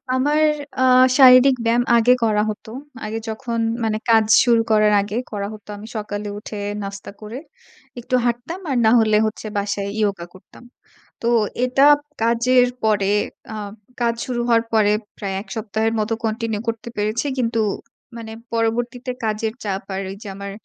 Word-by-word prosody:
আমার 290 +4 +1 0.4
আ - - +3 0.4
শারীরিক 255 0 +8
ব্যায়াম 235 +1 +3
আগে 240 +2 +5
করা 210 -1 +2
হত। 210 - -8 0.4
আগে 220 +1 -3
যখন 230 +1 -3 0.2
মানে 215 -1 0
কাজ 220 -1 +5 0.2
শুরু 235 -2 +4
করার 215 -1 +4
আগে 205 +2 -4 0.2
করা 200 -1 -3
হতো 210 -1 -13
আমি 210 +2 -10
সকালে 210 -1 -4
উঠে, 210 0 -8 0.2
নাস্তা 200 0 -7
করে 215 +4 -7 0.6
একটু 250 +2 -4
হাঁটতাম, 245 +10 -2
আর 265 - 0
না - - +6
হলে 215 -1 +3
হচ্ছে 215 0 -5
বাসায় 200 0 -2
yoga 195 -4 -1
করতাম। 185 +5 -17 0.6
তো 235 - 0 0.4
এটা 260 +2 +3 0.4
কাজের 245 +2 +3 0.2
পরে 205 -2 +2 0.4
আ - - -5 0.5
কাজ 235 -1 +1
শুরু 245 -2 -2
হওয়ার 230 -1 +3
পরে 210 -2 +3 0.3
প্রায় 195 -2 -4
১ - - -23
সপ্তাহের 220 +1 -1
মতো 215 +2 -1
continue 220 -1 -2
করতে 225 0 -3
পেরেছি। 215 +6 -1
কিন্তু 230 -2 0 0.6
মানে 220 -1 -8 0.2
পরবর্তীতে 240 +2 -1
কাজের 220 +1 -1
চাপ 195 -1 -2
আর 195 - -3
ওই 195 - -7
যে 205 - -8
আমার 200 0 -6
220 Hz, 160 wpm, -21 LUFS, 210-235 Hz, 0.6 s, শারীরিক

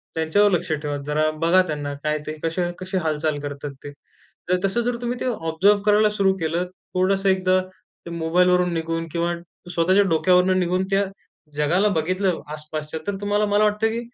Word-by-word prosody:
त्यांच्यावर 180 +6 +3
लक्ष 175 -2 -1
ठेवा. 150 -1 -3
जरा 155 +1 +1 0.2
बघा 185 +2 +5
त्यांना 145 -2 -3
काय 150 0 0
ते 155 - -5
कसे, 175 +2 -1
कसे 190 +1 -3
हालचाल 155 -1 0
करतात 145 0 -5
ते. 145 - -7 0.6
तर 180 - +3
तसं 215 +5 +1
जर 240 0 -1
तुम्ही 245 0 -3
ते - - -3
ऑब्झर्व्ह 190 +4 +2
करायला 210 0 +4
सुरु 200 -2 +2
केलं, 165 +2 -1 0.3
थोडंसं 195 +1 +2
एकदा 185 0 +3 0.5
ते 170 - -7
मोबाईलवरून 180 +2 +2
निघून 165 0 -2
किंवा 170 +1 0 0.4
स्वतःच्या 185 +5 +4
डोक्यावरून 180 +3 +3
निघून 180 +1 +1
त्या 195 +1 +3 0.5
जगाला 165 +8 +2
बघितलं, 185 +3 0
आसपासच्या 155 0 -5
तर 205 - -1
तुम्हाला 205 +1 +1
मला 205 +1 +2
वाटतं 210 +1 +2
की 230 +1 -2
180 Hz, 170 wpm, -23 LUFS, 160-195 Hz, 0.6 s, बघा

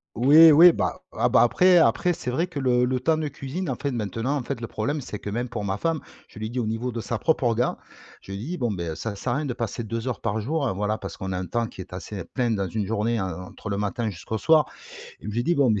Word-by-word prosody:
Oui, 150 +7 +8
oui, 170 +4 +9
bah, - - -2
ah - - +2
bah, - - +5
après 180 +9 +5
après 165 +7 +3
c'est 125 - -5
vrai 160 +8 +1
que 165 -6 -6
le 125 -2 +3
le 130 0 0
temps 155 +5 +2
de 155 -1 -2
cuisine 140 +7 -5
en 135 - 0
fait, 140 +2 -3
maintenant, 115 +4 -2
en 130 - -3
fait, 120 -1 -4
le 115 - -4
problème 140 +9 -2
c'est 115 -4 -6
que 105 - -6
même 120 +3 -2
pour 110 -3 -4
ma 95 0 -1
femme 165 -2 0 0.3
je - - -17
lui 110 - -4
ai - - -4
dit 125 +2 -3
au 115 - -1
niveau 115 +3 -2
de 115 -1 -4
sa 115 +3 -3
propre 155 +2 +1
orga, 120 +1 +1 0.4
je - - -11
lui 100 - -4
ai - - -6
dit: 180 +4 -4
«Bon, 120 -3 0
beh, 85 -4 -3
ça 110 +3 -4
sert 120 +4 -2
à - - 0
rien 150 - -2
de 125 - -2
passer 115 0 -3
2 115 +3 -4
heures 125 - -3
par 110 -1 -1
jour». 140 +4 -1
Voilà, 105 +2 -1
parce 95 - -7
qu'on 95 0 -4
a 90 - -2
un 90 - -4
temps 120 -1 0
qui 105 - -9
est 90 - -11
assez 95 +2 -6
plein 120 -3 -1
dans 100 -3 0
une 105 +1 -2
journée, 110 +2 0
en 95 -1 -2
entre 90 +3 -9
le 100 - -1
matin 105 +2 -2
jusqu'au 100 +4 -5
soir 155 +4 +4 0.5
et - - -10
je - - -3
lui 115 +3 -1
ai - - 0
dit: 175 - +2
«Bon, 140 -5 +3
mais 105 -2 +1
120 Hz, 305 wpm, -25 LUFS, 105-140 Hz, 0.5 s, oui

